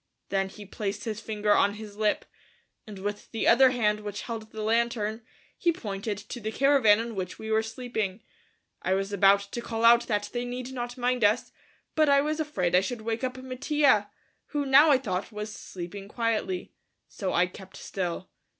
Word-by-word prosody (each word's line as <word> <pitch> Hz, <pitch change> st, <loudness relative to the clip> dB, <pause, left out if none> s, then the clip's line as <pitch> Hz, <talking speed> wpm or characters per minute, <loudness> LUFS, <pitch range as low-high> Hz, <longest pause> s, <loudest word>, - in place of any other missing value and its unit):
Then 195 Hz, -1 st, 0 dB
he 205 Hz, +1 st, -11 dB
placed 205 Hz, +1 st, -4 dB
his 220 Hz, -1 st, -4 dB
finger 210 Hz, -2 st, -1 dB
on 205 Hz, 0 st, +3 dB
his 210 Hz, -1 st, -9 dB
lip, 210 Hz, 0 st, 0 dB, 0.6 s
and 210 Hz, -2 st, -8 dB
with 205 Hz, +2 st, -5 dB
the 225 Hz, -, -1 dB
other 260 Hz, +2 st, +7 dB
hand 215 Hz, -4 st, +1 dB
which 205 Hz, -1 st, -6 dB
held 225 Hz, -2 st, -6 dB
the 220 Hz, -1 st, -6 dB
lantern, 225 Hz, -1 st, 0 dB, 0.3 s
he 345 Hz, -, +2 dB
pointed 205 Hz, -, -4 dB
to 205 Hz, +4 st, -8 dB
the 220 Hz, -1 st, -4 dB
caravan 265 Hz, -5 st, +5 dB
in 230 Hz, 0 st, -4 dB
which 185 Hz, -3 st, -4 dB
we 220 Hz, 0 st, -6 dB
were 220 Hz, 0 st, +4 dB
sleeping. 220 Hz, -3 st, -4 dB, 0.6 s
I 185 Hz, -, +1 dB
was 195 Hz, +1 st, -2 dB
about 200 Hz, 0 st, +5 dB
to 200 Hz, +4 st, -6 dB
call 230 Hz, -1 st, -2 dB
out 235 Hz, 0 st, +6 dB
that 205 Hz, -1 st, -1 dB
they 240 Hz, 0 st, -1 dB
need 250 Hz, +1 st, -5 dB
not 245 Hz, 0 st, -5 dB
mind 250 Hz, -1 st, 0 dB
us, 210 Hz, +4 st, +2 dB, 0.4 s
but 310 Hz, -2 st, +3 dB
I 280 Hz, 0 st, +6 dB
was 305 Hz, +2 st, -1 dB
afraid 195 Hz, -, -1 dB
I 180 Hz, -, +6 dB
should 240 Hz, +3 st, -4 dB
wake 225 Hz, +3 st, -3 dB
up 255 Hz, 0 st, -2 dB
Mattia, 260 Hz, -3 st, +2 dB, 0.4 s
who 290 Hz, -1 st, -2 dB
now, 275 Hz, +3 st, +7 dB
I 280 Hz, -, +6 dB
thought, 200 Hz, -7 st, -3 dB
was 210 Hz, 0 st, -5 dB
sleeping 190 Hz, +2 st, -8 dB
quietly, 230 Hz, -, -2 dB, 0.3 s
so 190 Hz, -3 st, -4 dB
I 180 Hz, -, +4 dB
kept 190 Hz, +1 st, -12 dB
still. 180 Hz, -1 st, -4 dB
220 Hz, 190 wpm, -27 LUFS, 205-245 Hz, 0.6 s, other